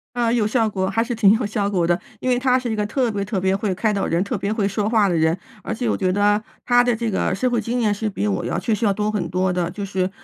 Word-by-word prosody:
呃， 235 -1 +1
有 225 -4 +2
效 225 -1 +1
果， 190 -2 -1
还 225 +4 +1
是 240 +1 -3
挺 215 -3 +5
有 225 +1 0
效 205 -1 -1
果 180 -4 +1
的， 175 +1 +1 0.2
因 255 - -2
为 245 -1 +2
他 255 0 +3
是 250 -2 -3
一 - - -1
个 210 -1 -1
特 240 +2 0
别 200 -1 -2
特 200 0 -2
别 190 +1 +1
会 195 -1 -1
开 210 +2 0
导 195 - -1
人、 170 +2 +1
特 200 - -3
别 200 - -2
会 215 -2 0
说 205 +1 -1
话 220 -3 +3
的 175 - 0
人。 160 +2 +2 0.3
而 - - -3
且 240 +1 -3
我 - - +1
觉 185 -1 0
得 205 +2 +2 0.2
他 245 0 +5
的 245 -1 +1
这 230 0 -2
个 190 - 0
社 255 +6 0
会 240 -2 0
经 240 +3 -2
验 210 -2 +2
是 215 +1 -2
比 105 - -2
我 100 -2 -1
要 - - -2
确 225 - -1
实 225 +2 0
要 205 - +3
多 210 +1 -1
很 185 -6 -2
多 185 +1 0
的， 175 -1 -1
就 200 +2 -5
是 190 -1 -1
210 Hz, 340 characters per minute, -21 LUFS, 190-230 Hz, 0.3 s, 挺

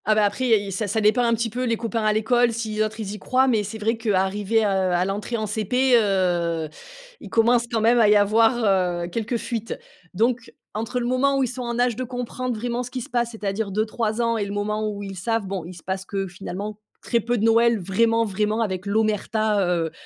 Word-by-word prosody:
Ah 215 - +3
bah 215 -1 +4
après, 255 +5 -1
il 220 -3 +4
y - - -7
a - - -5
ça 205 +3 -2
ça 205 +3 0
dépend 215 +3 +3
un 235 -1 +2
petit 230 0 -2
peu 250 +3 -3
les 230 -2 0
copains 230 0 -2
à 215 - +3
l'école, 235 +3 +2
si 225 -1 -3
les 215 - -1
autres 215 +1 -2
ils 205 -3 -4
y 210 - -7
croient. 260 +6 +2
Mais 225 -5 +3
c'est 210 +2 -6
vrai 220 +2 0
qu'arriver, 210 0 +1
heu, - - +3
à 185 -2 +1
l'entrée 205 +4 -3
en 215 - -2
CP, 235 +5 +1
heu, 175 -7 +1 0.5
ils - - -10
commencent 235 +1 +3
quand 225 -2 0
même 235 +2 +4
à 215 -3 +5
y 210 - +6
avoir, 205 -4 +3
heu, - - -3
quelques 230 +5 -2
fuites. 230 -1 -4 0.4
Donc, 230 +4 0 0.2
entre 225 +4 -2
le 240 - -2
moment 265 +3 +2
où 270 - +2
ils - - +1
sont 250 +2 -6
en 235 -1 -3
âge 245 -1 +2
de 255 - -3
comprendre 250 -1 -4
vraiment 240 +2 -2
ce 250 - -6
qui 255 0 -5
se - - -8
passe, 240 -1 0
c'est-à-dire 210 -1 -3
2-3 215 +2 -1
ans 230 0 +1
et 205 - -1
le 200 - -6
moment 210 +1 -1
où 205 -1 -6
ils 195 -1 -7
savent, 225 +3 -1
bon, 190 -3 -4
il 180 +1 -9
se 170 - -13
passe 190 0 -3
que 195 -1 -3
finalement 195 +3 -6 0.2
très 235 - +1
peu 240 +2 -1
de 215 - -1
Noël, 230 0 +4
vraiment, 225 +5 +2
vraiment, 210 +2 -1
avec 190 -4 -2
l'omerta, 215 0 +1
heu, 170 -2 0
220 Hz, 245 wpm, -23 LUFS, 200-235 Hz, 0.5 s, y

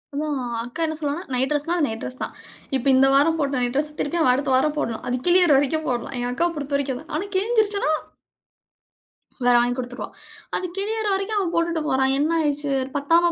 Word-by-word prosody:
அதான் 295 -2 -2 0.2
அக்கா 245 +7 -9
என்ன 315 0 -3
சொல்லுவான்னா 295 +2 -3
நைட் 255 +1 +1
டிரஸ்னா 300 +4 +1
அது 320 - +2
நைட் 225 0 -5
டிரஸ்னா 255 - -6
தான். - - -10 0.4
இப்ப 260 -1 -2
இந்த 270 +1 +5
வாரம் 320 +4 +4
போட்ட 280 -1 0
நைட் 245 +1 -1
டிரஸ்னா 300 +1 -1
திருப்பியும் 325 +3 0
அவன் 250 - +5
அடுத்த 270 0 -1
வாரம் 295 +3 +2
போடணும். 230 -6 -2
அது 250 - 0
கிழியற 355 -2 +6
வரைக்கும் 295 +3 0
போடலாம். 245 +2 -3
எங்க 245 0 -1
அக்காவ 340 +6 +1
பொறுத்தவரைக்கும் 280 -2 -2
அதான். - - -12
ஆனா 380 +6 -2
கிழிஞ்சிருச்சுன்னா? 410 -3 +2 1.5
வேற 245 - +5
வாங்கி 245 +1 +1
குடுத்துருவா. 250 0 -5 0.5
அது 365 - -1
கிழியற 435 +2 -1
வரைக்கும், 395 +2 -1
அவன் 360 -4 -1
போட்டுட்டு 335 -1 0
போறான். 265 -1 +2
என்ன 300 +3 +1
ஆயிடுச்சு? 290 -2 0 0.2
பத்தாம 335 +4 +3
295 Hz, 195 wpm, -23 LUFS, 265-340 Hz, 1.5 s, கிழியற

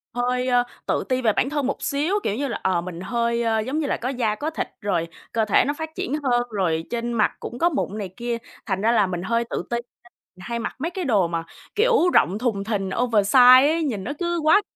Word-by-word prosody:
hơi, 250 +1 0
ơ, 245 -1 +3 0.2
tự - - 0
ti 255 0 +1
về 220 -3 +3
bản 265 - +1
thân 290 -3 -1
một 275 - -3
xíu, 300 +8 0
kiểu 205 - -1
như 275 +4 -2
là, 235 - -4
ờ, 185 -2 +1
mình 175 -1 -7
hơi, 235 +3 0
ơ, 225 -1 +1
giống 260 +8 -2
như 295 - -1
là - - 0
có 250 - -3
da 235 -5 0
có 295 +7 -3
thịt, 320 - -3
rồi 175 -5 0 0.2
cơ 225 -1 +1
thể 210 - +4
nó 285 - 0
phát 320 +1 -5
triển 270 - -3
hơn, 245 -3 +2
rồi 175 -7 0
trên 235 0 -2
mặt 215 - +2
cũng 240 - -7
có 340 - +4
mụn 265 - -2
này 200 -3 -4
kia, 240 -1 -2 0.3
thành 190 -2 -2
ra 225 +2 +3
là 210 -4 +3
mình 175 -1 -3
hơi 230 +4 +1
tự - - -3
ti 240 - -1
nên - - -3 0.6
mình 180 - -13
hay 235 0 -2
mặc 230 - -4
mấy 320 +6 -2
cái 365 0 -4
đồ 205 - +2
mà, 165 -1 -3 0.3
kiểu, 445 -5 +3
rộng 190 +4 +3
thùng 220 -5 -1
thình 200 -3 -2
oversize 245 +4 +6
ấy, 330 - -1
nhìn 225 -11 -2
nó 245 - -3
cứ 345 0 -1
quá 320 +7 +5
235 Hz, 255 wpm, -23 LUFS, 205-275 Hz, 0.6 s, oversize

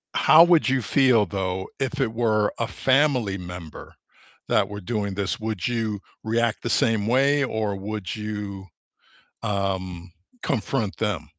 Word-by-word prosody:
how 160 +2 +7
would 170 -6 +4
you 130 -1 +1
feel 125 -2 +3
though 95 0 -3
if 135 +1 -2
it 115 -4 0
were 110 -3 +2
a 115 - +1
family 130 -8 +1
member 90 -3 -9 0.6
that 100 -1 +2
were 105 0 -6
doing 100 0 -2
this? 100 +3 -2
Would 110 -3 -2
you 110 -4 -2 0.2
react 115 0 0
the 120 - -2
same 110 -3 +2
way 140 +3 +3
or 110 -5 -1
would 105 0 -5
you, 105 -2 -5 0.8
um, 95 -3 -3 0.3
confront 110 -1 -1
them? 105 -7 -2
110 Hz, 140 wpm, -24 LUFS, 100-120 Hz, 0.8 s, how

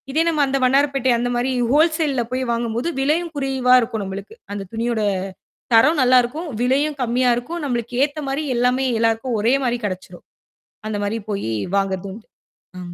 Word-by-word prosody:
இதே 300 +4 +1
நம்ம 315 -3 +1
அந்த 275 0 0
வண்ணாரப்பேட்டை 275 0 +2
அந்தமாரி 245 +2 -1 0.2
ஹோல்சேல்ல 310 -3 +2
போய் 255 +1 -1
வாங்கும் 235 -1 -2
போது 255 +8 -1
விலையும் 320 +5 0
குறைவா 265 -3 +1
இருக்கும் 225 -3 -2
நம்மளுக்கு. 195 - -7 0.2
அந்தத் 195 -2 -6
துணியோட 230 0 -1 0.7
தரம் 295 +8 +5
நல்லா 255 0 +5
இருக்கும். 305 +8 -5
விலையும் 280 +4 +1
கம்மியா 250 +1 +2
இருக்கும். 325 +8 -5
நம்மளுக்கு 240 -1 -2
ஏத்தமாரி 290 0 -3
எல்லாமே 250 +2 +2
எல்லாருக்கும் 225 +2 0
ஒரேமாரி 245 +2 +1
கிடைச்சுடும். 185 -2 -6 0.6
அந்தமாரி 205 +1 -2
போய் 200 - -3 0.3
வாங்குறதும் 195 -1 -1
உண்டு. 220 - -14 0.5
ஆ. - - -7
250 Hz, 150 wpm, -21 LUFS, 225-275 Hz, 0.7 s, தரம்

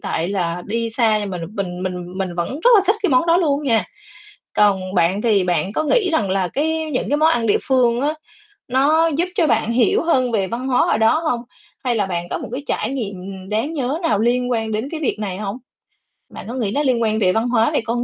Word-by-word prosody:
tại 165 +3 -2
là 175 -3 -2
đi 230 +2 -2
xa 220 -2 +2
nhưng 205 -1 -4
m - - -6 0.2
mình 180 -2 -4
mình 180 0 -5
mình 185 -2 -3
vẫn 170 -1 -2
rất - - +4
là - - +6
thích 405 +3 +3
cái 390 - +2
món 255 +6 +3
đó 335 - +4
luôn 300 -5 +1
nha. 230 -6 +2 0.7
Còn 190 -2 +2
bạn 185 +3 +2
thì 210 -5 +3
bạn 180 +1 0
có 310 - -1
nghĩ 400 +1 +2
rằng 205 -10 +1
là 190 -2 0
cái 315 - -1
những 255 - -1
cái 290 - +3
món 315 +1 +4
ăn 235 -7 0
địa 205 - +3
phương 245 -2 +3
á, 295 +3 0 0.5
nó 295 +6 +3
giúp 330 +4 -1
cho 340 -6 +3
bạn 230 -2 +1
hiểu 235 -2 +2
hơn 255 -7 +1
về 195 -3 +1
văn 245 +5 -4
hóa 250 - +3
ở - - +2
đó 225 +9 +3
hông? 250 -8 -1 0.4
Hay 245 - +1
là 200 -2 +1
bạn 175 -2 -4
có - - -2
một - - -7
cái 270 +3 -4
trải 220 - -1
nghiệm 195 -6 -6
đáng 225 +9 -1
nhớ 280 0 -2
nào 215 -11 +1
liên 245 +2 +1
quan 225 -2 -1
đến 220 +5 -2
cái 315 - -4
việc 290 - -1
này 190 -3 -4
hông? 210 +2 -4 0.8
Bạn - - -8
có - - -4
nghĩ 225 -6 -1
nó 290 +5 0
liên 255 -4 +1
quan 220 0 +1
về 185 -4 +3
văn 225 +4 0
hóa, 230 -2 +2
về - - +1
con 240 +1 -1
230 Hz, 250 wpm, -20 LUFS, 195-275 Hz, 0.8 s, là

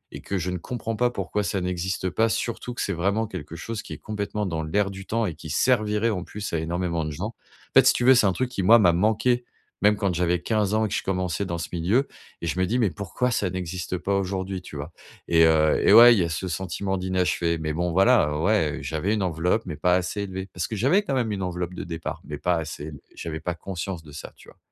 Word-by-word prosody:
et - - -8
que 100 - -3
je 90 +1 -2
ne 90 - -2
comprends 115 +3 -4
pas 125 +3 +2
pourquoi 105 0 -2
ça 95 0 -1
n'existe 90 +1 -2
pas, 115 +3 +2
surtout 120 +2 -3
que - - -3
c'est - - -1
vraiment 100 +6 0
quelque 80 -5 -7
chose 110 +6 -5
qui - - -8
est - - -7
complètement 105 0 -3
dans 80 -4 -2
l'air 100 +5 0
du 95 0 -9
temps 115 0 0
et 90 - -2
qui 80 0 -10
servirait 110 - +2
en 90 -4 -3
plus 105 -2 -6
à 85 - +1
énormément 85 0 -2
de - - -3
gens. 90 +8 -4
En - - -13 0.4
fait, - - +7
si - - +7
tu 120 - -1
veux, 130 - +8
c'est 120 -4 +4
un 95 - +2
truc 130 +6 -1
qui 100 - -2
moi, 115 +6 +8
m'a 90 -5 +5
manqué 110 +6 +2 0.4
même 105 +1 +5
quand 100 -3 0
j'avais 90 0 +1
15 105 +1 0
ans 110 0 +2
et - - -2
que - - -4
je - - -2
commençais 95 0 -1
dans 85 -2 -3
ce 85 - -4
milieu 100 +11 +1 0.3
et 85 - -3
je 90 - -2
me 95 - +3
dis: 120 - 0
«Mais 110 -6 +2
pourquoi 105 +6 -2
ça 100 -5 0
n'existe 90 0 -4
pas 100 +3 -1
aujourd'hui?» 95 -1 -3
Tu 80 - -11
vois? 75 +4 -7 0.3
Et 80 -1 +5
heu 80 -1 +4
et - - +7
ouais, 120 +2 +10
il - - +1
y 90 - +3
a 85 - -1
ce 80 +4 -3
sentiment 95 +2 -2
d'inachevé. 90 -2 0
Mais 75 -1 -2
bon, 85 +2 -1
voilà, 95 -6 +4
ouais, 80 -4 +1
j'avais 80 +8 -1
une 105 - -1
enveloppe, 90 +5 0
mais 90 -5 -5
pas 90 +4 +3
assez 90 +3 -1
élevée, 95 0 -5
parce 90 - -2
que 110 - -4
j'avais, 140 - +3
quand 140 - -2
même, 120 -4 0
une 100 - -4
enveloppe 90 0 -3
de - - -5
départ, 80 -1 -5
mais - - -6
pas 90 - +1
assez 80 -3 -5
élevée. 75 -3 -9
J'avais 80 -1 -5
pas 90 - -3
conscience 90 -1 -5
de 75 - -13
ça, 75 - -8
tu - - -17
vois? - - -19
95 Hz, 265 wpm, -25 LUFS, 85-105 Hz, 0.4 s, ouais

